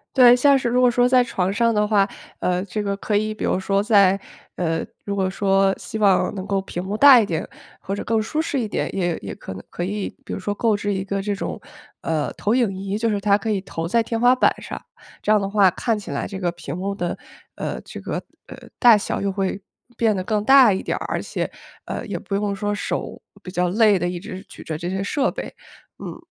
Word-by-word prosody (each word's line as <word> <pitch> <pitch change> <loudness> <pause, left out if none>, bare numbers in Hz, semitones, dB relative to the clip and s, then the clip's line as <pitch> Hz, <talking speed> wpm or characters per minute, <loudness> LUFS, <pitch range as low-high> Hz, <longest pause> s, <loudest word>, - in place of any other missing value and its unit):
对， 245 -2 +8
像 275 +2 +5
是 260 - -2
如 245 +1 +2
果 250 - +6
说 245 +1 +3
在 250 0 +5
床 190 -6 -1
上 230 +2 +2
的 210 -1 +2
话， 205 -2 +3 0.3
呃， 180 0 0
这 210 +2 -3
个 200 -1 -1
可 210 +1 -2
以 215 +1 +1
比 - - -6
如 - - +1
说 195 +1 +1
在 200 -3 +4 0.4
呃， 165 -2 -1 0.2
如 200 - -2
果 190 -1 0
说 195 0 +2
希 220 - -6
望 195 -3 +3
能 190 -2 -5
够 195 -1 +1
屏 180 -2 -5
幕 200 +3 -3
大 275 0 +9
一 220 - +2
点， 165 -4 -3 0.3
或 195 - -4
者 - - -5
更 225 0 +1
舒 300 +8 -1
适 310 -3 -2
一 230 - -1
点， - - -3
也 175 -3 0
也 95 - -6
可 - - -8
能 95 - -9
可 175 - -4
以 200 +2 -3 0.2
比 - - -5
如 - - -4
说 205 +2 -2
购 225 0 +2
置 205 0 -2
一 190 -1 -2
个 195 0 -2
这 205 +1 -2
种， - - -5 0.4
呃， 155 -2 -1
投 215 +3 0
影 240 -6 +2
仪 195 +1 -3
就 230 +1 0
是 205 -2 -1
它 200 0 +4
可 220 +1 -3
以 200 -2 0
投 165 -3 -5
在 230 +6 +2
天 230 0 -3
花 245 +2 +5
板 255 - +4
上， - - -7 0.4
这 210 - +1
样 215 - +5
的 195 - -2
话 200 -2 +5
看 225 +5 -1
起 205 - -10
来 140 - -2
这 195 -1 -6
个 175 -2 0
屏 175 -1 -7
幕 195 +2 -3
的， 175 -3 -2 0.4
呃， - - -4
这 - - -10
个， - - -5 0.3
呃， - - -10 0.2
大 235 -4 +7
小 205 - -3
又 200 0 0
会 195 0 -2 0.3
变 225 -2 +2
得 185 - -2
更 210 +1 -1
大 265 -3 +7
一 190 - -2
点 - - -2
儿， - - -5
而 - - -1
且， - - -3 0.4
呃， - - -4
也 - - -3
不 - - -7
用 200 0 0
说 205 +1 -2
手 205 - -4 0.2
比 180 - -8
较 180 -1 0
累 210 0 +4
地 175 +1 -1
一 175 -1 -4
直 185 0 -8
举 - - -11
着 155 - -4
这 175 - -3
些 190 +1 -2
设 270 +7 0
备， - - -6 0.5
嗯。 - - -7
200 Hz, 270 characters per minute, -22 LUFS, 190-220 Hz, 0.5 s, 大